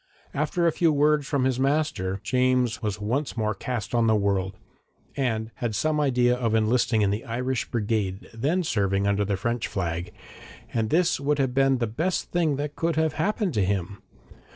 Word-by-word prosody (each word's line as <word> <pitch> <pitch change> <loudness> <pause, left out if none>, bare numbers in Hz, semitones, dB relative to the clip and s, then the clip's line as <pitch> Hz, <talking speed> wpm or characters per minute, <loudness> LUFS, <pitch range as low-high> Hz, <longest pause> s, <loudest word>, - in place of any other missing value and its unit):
After 155 +4 0
a 165 - +4
few 165 0 +2
words 150 -1 +2
from 140 -3 0
his 130 -1 +1
master, 135 -9 0
James 125 -2 +1
was 105 -2 -2
once 125 +7 -2
more 110 -1 0
cast 115 +3 -4
on 115 -1 +3
the 110 - +4
world, 100 -2 0 0.6
and 115 -4 -1
had 115 -3 -2
some 155 +7 +1
idea 125 -4 +3
of 115 -3 0
enlisting 110 0 +2
in 100 - +2
the 105 +3 -2
Irish 125 +1 -2
brigade 105 -4 -2
then 150 +11 0
serving 100 - 0
under 100 0 +2
the 100 -1 -1
French 115 +4 -1
flag, 85 -2 -3 0.6
and 110 -2 0
this 175 -1 +2
would 145 +1 0
have 135 -3 0
been 135 0 +3
the 120 - 0
best 160 +12 -2
thing 165 -5 +1
that 145 +1 -4
could 165 -1 0
have 160 -1 +1
happened 195 +2 0
to 105 - +2
him. 100 0 -2
120 Hz, 185 wpm, -25 LUFS, 105-145 Hz, 0.6 s, a